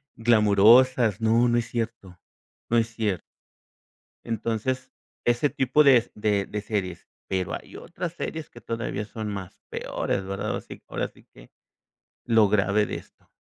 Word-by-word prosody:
glamorosas. 115 +1 +5
No, 115 +2 +4
no 120 0 +2
es 115 - -4
cierto, 115 -6 -5 0.5
no 120 - +3
es 115 -1 +3
cierto. 105 -6 0 1.1
Entonces, 115 +3 -2 0.3
ese 120 +4 +2
tipo 140 +1 +3
de 135 -3 +7
s 115 - -2
de 105 -2 +1
de 105 0 -4
series, 100 -4 -3 0.2
pero 95 -2 -2
hay - - -8
otras 170 -1 -6
series 160 -2 -5
que 120 - -14
todavía 115 -2 -3
son 110 0 -6
más 100 -3 -7
peores 95 - -2
¿verdad?, 100 +2 -4
ahora - - -2
sí - - -12
ahora - - -2
sí - - -21
que - - -16 0.7
lo 115 -3 +5
grave 105 0 +2
de - - -5
esto. - - -12
110 Hz, 155 wpm, -26 LUFS, 100-120 Hz, 1.1 s, de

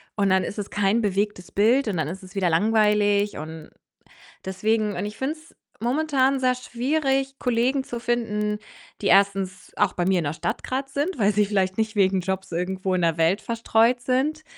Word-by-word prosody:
und 200 -2 +1
dann 190 -1 +3
ist 205 - -5
es 205 - -4
kein 205 +3 +1
bewegtes 200 -2 -2
Bild 230 +5 +3
und 195 - -1
dann 155 -2 -1
ist 190 +3 -7
es 185 - -14
wieder 185 -3 +1
langweilig 210 +1 +2
und 155 +1 -8 0.8
deswegen 210 +2 0
und 190 - -2
ich 210 - -7
finde 275 +4 -1
es 320 +1 -19 0.3
momentan 270 +1 +1
sehr 255 -1 +2
schwierig, 270 +2 -1
Kollegen 250 +2 +1
zu 240 - -6
finden, 210 -3 -1 0.4
die 200 - +1
1. 195 -1 +2
auch - - +2
bei 175 0 -1
mir 190 -2 +3
in - - -4
der 145 - -1
Stadt 220 - -3
grad 265 +1 -3
sind, 285 +4 -2
weil 205 0 +3
sie 210 - +3
vielleicht 190 -2 0
nicht 220 -1 -1
wegen 190 -1 +3
Jobs 190 +1 -3
irgendwo 185 +2 -2
in 180 - 0
der 165 -1 +1
Welt 175 +6 +2
verstreut 230 +1 +2
sind. 270 +6 0
210 Hz, 195 wpm, -24 LUFS, 190-250 Hz, 0.8 s, dann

